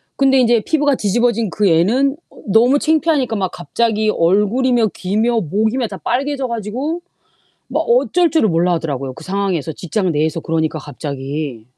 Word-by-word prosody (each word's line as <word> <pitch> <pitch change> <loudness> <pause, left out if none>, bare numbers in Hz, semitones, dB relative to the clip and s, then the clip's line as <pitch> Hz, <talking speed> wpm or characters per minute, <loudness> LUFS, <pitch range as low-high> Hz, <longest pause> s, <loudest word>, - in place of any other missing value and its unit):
근데 270 -1 +3
인제 235 -2 +3
피부가 290 -3 +2
뒤집어진 230 0 0
그 205 +1 0
애는 235 - +2
어 - - -21
너무 240 +7 +4
창피하니까 305 -7 +1
막 190 -3 -2
갑자기 215 +3 -1
얼굴이며 220 +7 +2
귀며 220 +5 0
목이며 220 - 0
다 195 - -8
빨개져 270 - -2
가지고 245 - -3 0.7
막 - - -1
어쩔 360 -8 +2
줄을 315 -9 +2
몰라 175 +1 +2
하더라고요 140 -5 -3
그 160 - -12
상황에서 185 -4 -2
직장 185 +4 -2
내에서 155 +2 0
그러니까 160 -1 -1
갑자기. 140 -3 -5
215 Hz, 360 characters per minute, -18 LUFS, 165-255 Hz, 0.7 s, 너무